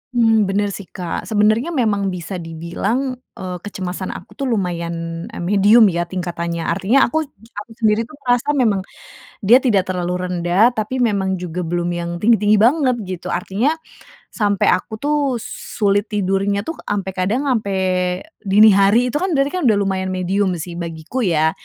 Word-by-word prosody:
Mmm, 225 -3 +4
bener 200 +1 0
sih 195 -2 -8
Kak. 175 -3 -5
Sebenernya 215 +4 +2
memang 210 -6 +1
bisa 180 0 -4
dibilang, 195 +11 -3 0.2
eee, 180 -1 -5
kecemasan 185 -1 -5
aku - - -11
tuh 275 - -1
lumayan, 170 -5 -3
eee, - - -7
medium 205 +5 +5
ya 170 0 -2
tingkatannya. 170 -2 -3
Artinya 200 +12 +2
aku 315 -1 0
aku 225 -4 -12
sendiri 220 0 +1
itu 305 - -13
merasa 250 +4 +1
memang 225 -8 +2 0.7
dia 245 +5 +7
tidak 205 -8 +2
terlalu 180 0 -2
rendah, 180 +6 +2
tapi 220 +4 -3
memang 200 -6 +1
juga 180 0 -4
belum 175 +1 -2
yang 170 0 -3
tinggi-tinggi 210 +1 +3
banget 255 +3 +3
gitu. 185 -2 -6
Artinya 215 - 0 0.5
sampai 205 -3 +1
aku 185 - -1
tuh 285 -5 0
sulit 205 0 -1
tidurnya 200 0 0
itu, 325 - -5 0.2
sampai 195 -2 -2
kadang 205 +9 0
sampai 200 -6 0 0.6
dini 210 +2 +5
hari 205 +6 +4
itu 295 - -1
kan 365 0 -1
berarti 275 0 +2
kan - - -3
udah 220 - +5
lumayan 190 -1 -1
medium 185 +1 0
sih 170 +1 -6
bagiku 165 +6 -5
ya, 160 -2 +3
200 Hz, 160 wpm, -19 LUFS, 180-230 Hz, 0.7 s, dia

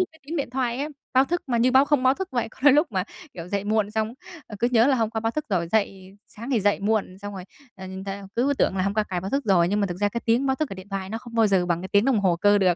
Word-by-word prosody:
những 370 - +2
cái 320 - -21
tiếng 330 +3 -4
điện 280 - -2
thoại 250 -1 -1
á, 290 +2 -2 0.3
báo 260 +1 +6
thức 350 +4 -2
mà 235 -2 +1
như 250 +2 +3
báo 265 +2 +6
không 285 -3 +1
báo 260 +1 +4
thức 380 +3 -5
vậy. 240 -2 -1
Có - - -20
đôi 290 -2 +7
lúc 295 -4 +2
mà, 185 -1 0 0.3
kiểu, 170 0 -8
dậy 200 0 -2
muộn 210 -1 +1
xong, 220 +2 -2 0.3
ờ, 210 - -9
cứ 240 - +3
nhớ 230 +1 +5
là 270 -2 +3
hôm 225 -2 0
qua 220 -1 -3
báo 225 0 0
thức 305 +4 -4
rồi 170 -4 0
dậy 195 -2 -1
sáng 235 +5 -9
thì 235 -5 +2
dậy 205 +1 +1
muộn, 200 -3 -1
xong 205 0 -7
rồi, 185 -1 -7 0.3
ờ, 190 0 -9
nhìn 190 +1 -7
theo 195 0 -6
cứ 270 +4 +2
tưởng 190 - +1
là 185 - +1
hôm 200 +2 -1
qua 215 - +2
cài 180 -3 -3
báo 190 +3 -5
thức 275 0 -1
rồi, 175 -4 +3
nhưng 205 +2 0
mà 200 - +2
thực 175 -1 -5
ra 205 0 +2
cái 235 +3 -4
tiếng 240 +4 +2
báo 265 0 +1
thức 310 -3 -2
ở - - -5
điện 190 +1 -11
thoại 195 -1 -4
nó 225 - -3
không 235 -1 -12
bao 225 -1 +4
giờ 190 -3 +2
bằng 170 -1 0
cái 190 - -6
tiếng 205 +2 +3
đồng 255 -6 +2
hồ 180 -3 +2
cơ 205 +3 +4
được. 185 -3 +3
215 Hz, 345 wpm, -24 LUFS, 195-255 Hz, 0.3 s, đôi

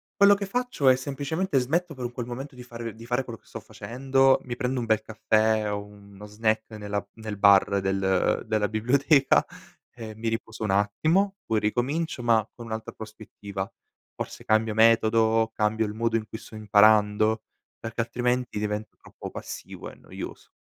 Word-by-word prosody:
Quello 200 0 +6
che 200 - -4
faccio 245 - -1
è 130 - +8
semplicemente 145 +6 -2
smetto 155 +6 0
per 125 -1 -5
un 120 - -4
quel 120 -1 -5
momento 135 +4 -6
di 125 - -10
fare 115 -2 -7
di 115 +1 -12
fare 125 +2 0
quello 115 -3 -9
che - - -31
sto - - -8
facendo, 135 +2 +1
mi 120 -1 -5
prendo 125 +1 -1
un 120 - -2
bel 110 -1 +2
caffè 110 0 +1
o 100 0 -3
uno 100 0 -14
snack 110 +1 -1
nella 105 -1 -3
nel 110 -2 -7
bar 100 0 +5
del 95 -1 +1
della 110 -2 +1
biblioteca 135 +6 +3 0.5
e 110 -2 -8
mi 115 +1 -5
riposo 110 -1 -5
un 105 - 0
attimo 155 - +2
poi 110 -1 +1
ricomincio 130 +8 -1
ma 115 -2 +3
con 120 -1 -9
un'altra 110 0 -5
prospettiva, 105 -3 -7 0.5
forse - - -7
cambio 110 0 +2
metodo, 115 0 +4
cambio 110 +1 +1
il 105 - -5
modo 115 +1 0
in 110 -1 -5
cui 110 - -7
sto 115 - -15
imparando 110 +1 +4 0.4
perché 115 +1 -3
altrimenti 120 -1 -1
diventa 105 0 -3
troppo - - -10
passivo - - -8
e - - -14
noioso. - - -9
110 Hz, 175 wpm, -26 LUFS, 105-125 Hz, 0.5 s, è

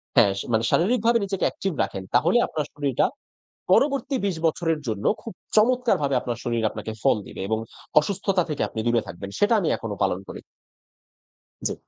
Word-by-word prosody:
হ্যাঁ, 100 - +6
সা - - -5
মানে 110 0 +2
শারীরিকভাবে 235 +5 +3
নিজেকে 195 -1 -1
active 195 -4 -3
রাখেন 95 - -5
তাহলে 165 - +4
আপনার 150 -2 -3
শরীরটা 140 -3 +1 0.7
পরবর্তী 275 +5 +3
২০ 195 -3 0
বছরের 165 0 0
জন্য 105 -2 -3 0.2
খুব 225 - -8 0.2
চমৎকারভাবে 225 - +3
আপনার 120 -2 -3
শরীর 115 -1 -1
আপনাকে 110 - -6
ফল - - +4
দিবে - - -8
এবং 110 +1 0 0.4
অসুস্থতা 190 +2 0
থেকে 150 - -2
আপনি - - -6
দূরে 120 -1 +3
থাকবেন। 100 +3 -7
সেটা 205 +3 +4
আমি 175 - -1
এখনো 110 -2 -5
পালন 95 -2 +1
করি। - - -7 1.3
জি। - - -2
155 Hz, 165 wpm, -24 LUFS, -, 1.3 s, হ্যাঁ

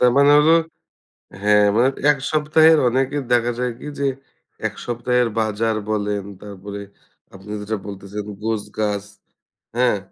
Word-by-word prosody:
তার 125 0 +5
মানে 140 +1 +6
হলো, 150 +2 +5 0.9
হ্যাঁ, 105 0 +5
মানে 120 +3 +4 0.2
১ 145 - +2
সপ্তাহের 155 +1 +5
অনেকের 135 +3 0
দেখা 120 0 +3
যায় 125 -1 -1
কী - - -9
যে, 140 - 0 0.6
১ - - -4
সপ্তাহের 120 0 +1
বাজার 110 0 0
বলেন, 105 -1 -1 0.2
তারপরে 100 0 -8 0.5
আপনি 95 +2 -12
যেটা 110 +2 -3
বলতেছেন, 100 +1 -7 0.2
গোছগাছ, 105 -2 -2 0.7
হ্যাঁ? 120 -4 +3
115 Hz, 130 wpm, -21 LUFS, 105-125 Hz, 0.9 s, মানে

